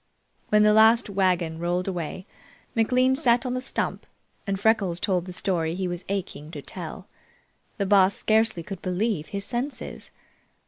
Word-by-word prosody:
When 210 Hz, 0 st, +5 dB
the 210 Hz, 0 st, +5 dB
last 220 Hz, 0 st, +5 dB
wagon 180 Hz, -4 st, +1 dB
rolled 175 Hz, +2 st, -1 dB
away, 180 Hz, 0 st, -4 dB, 0.5 s
McLean 255 Hz, +3 st, +3 dB
sat 245 Hz, -3 st, +3 dB
on 250 Hz, -, -1 dB
the 255 Hz, -, -2 dB
stump 260 Hz, -, -3 dB, 0.4 s
and 195 Hz, -1 st, -1 dB
Freckles 200 Hz, -5 st, +2 dB
told 180 Hz, -3 st, 0 dB
the 185 Hz, -, -7 dB
story 175 Hz, -3 st, -1 dB
he 185 Hz, 0 st, -2 dB
was 175 Hz, 0 st, -5 dB
aching 185 Hz, -6 st, -4 dB
to 145 Hz, -, -6 dB
tell. 180 Hz, +1 st, -7 dB, 0.7 s
The 200 Hz, -, 0 dB
Boss 195 Hz, 0 st, +4 dB
scarcely 220 Hz, -5 st, +1 dB
could 195 Hz, +1 st, -7 dB
believe 185 Hz, -3 st, -1 dB
his 200 Hz, +3 st, -4 dB
senses. 255 Hz, +5 st, -4 dB
195 Hz, 155 wpm, -25 LUFS, 180-220 Hz, 0.7 s, When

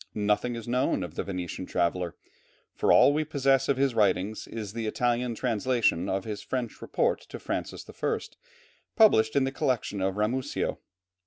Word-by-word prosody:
Nothing 105 Hz, +3 st, 0 dB
is 115 Hz, -1 st, -7 dB
known 125 Hz, +3 st, +1 dB
of 85 Hz, -3 st, -7 dB
the -, -, -2 dB
Venetian 90 Hz, -1 st, -5 dB
traveller, 85 Hz, 0 st, -1 dB, 0.6 s
for -, -, +2 dB
all 145 Hz, -, +7 dB
we 155 Hz, +1 st, +1 dB
possess 135 Hz, -3 st, +1 dB
of 140 Hz, -, +2 dB
his 135 Hz, -1 st, +2 dB
writings 105 Hz, 0 st, +1 dB
is 105 Hz, -3 st, -6 dB
the 115 Hz, -1 st, -3 dB
Italian 120 Hz, +1 st, 0 dB
translation 110 Hz, -6 st, +1 dB
of 95 Hz, 0 st, -1 dB
his 105 Hz, -2 st, -5 dB, 0.4 s
report -, -, 0 dB
to -, -, -6 dB
Francis -, -, -4 dB
I. -, -, -2 dB, 0.8 s
published 110 Hz, -, +5 dB
in 140 Hz, -, +4 dB
the 135 Hz, -, 0 dB
collection 130 Hz, -8 st, -1 dB
of 95 Hz, 0 st, 0 dB
Ramusio. 125 Hz, +6 st, -1 dB
115 Hz, 160 wpm, -28 LUFS, 100-130 Hz, 0.8 s, all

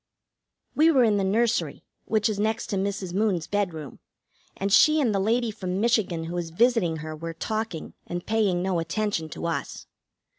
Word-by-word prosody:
We 315 Hz, +2 st, +5 dB
were 270 Hz, -6 st, +5 dB
in 215 Hz, -3 st, +3 dB
the 195 Hz, -, +1 dB
nursery, 225 Hz, +4 st, 0 dB, 0.2 s
which 215 Hz, -2 st, +1 dB
is 210 Hz, -2 st, -2 dB
next 220 Hz, +2 st, -1 dB
to -, -, 0 dB
Mrs. 195 Hz, -2 st, -2 dB
Moon's 195 Hz, -5 st, +1 dB
bedroom, 175 Hz, -8 st, -3 dB, 0.6 s
and 195 Hz, 0 st, -1 dB
she 310 Hz, +5 st, +6 dB
and 245 Hz, -7 st, +2 dB
the 195 Hz, -, +1 dB
lady 225 Hz, +3 st, +1 dB
from 185 Hz, -3 st, -4 dB
Michigan, 210 Hz, -7 st, +1 dB
who 165 Hz, +2 st, -5 dB
is 170 Hz, -2 st, -3 dB
visiting 190 Hz, -3 st, +2 dB
her, 155 Hz, 0 st, -5 dB
were 165 Hz, +1 st, -6 dB
talking 215 Hz, -1 st, -4 dB
and 175 Hz, 0 st, -5 dB
paying 205 Hz, -5 st, +1 dB
no 185 Hz, -2 st, 0 dB
attention 170 Hz, -1 st, -2 dB
to -, -, -6 dB
us. 170 Hz, -, -3 dB
200 Hz, 180 wpm, -26 LUFS, 175-220 Hz, 0.6 s, she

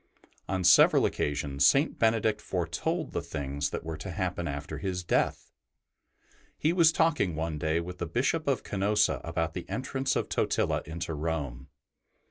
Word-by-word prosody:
On 95 Hz, -1 st, -1 dB
several 90 Hz, -, +6 dB
occasions 70 Hz, -1 st, -1 dB
St. 140 Hz, -, +4 dB
Benedict 110 Hz, -1 st, +2 dB
foretold -, -, -2 dB
the -, -, -2 dB
things 70 Hz, +1 st, -3 dB
that -, -, -5 dB
were 80 Hz, 0 st, -5 dB
to 95 Hz, -, -7 dB
happen 90 Hz, -1 st, -2 dB
after 75 Hz, +1 st, -5 dB
his 90 Hz, +1 st, -3 dB
death. -, -, 0 dB, 1.1 s
He 160 Hz, +3 st, +1 dB
was 170 Hz, -3 st, +5 dB
talking 150 Hz, -, +1 dB
one 80 Hz, -1 st, -3 dB
day 80 Hz, +2 st, +1 dB
with 90 Hz, +1 st, -7 dB
the 85 Hz, -, -2 dB
Bishop 140 Hz, -, 0 dB
of 135 Hz, -4 st, +1 dB
Canosa 105 Hz, +1 st, +1 dB
about 80 Hz, -1 st, -2 dB
the 90 Hz, -, -7 dB
entrance 135 Hz, +1 st, -2 dB
of -, -, -1 dB
Totila -, -, 0 dB
into 80 Hz, 0 st, -4 dB
Rome. 75 Hz, -5 st, -3 dB
85 Hz, 155 wpm, -29 LUFS, 80-110 Hz, 1.1 s, several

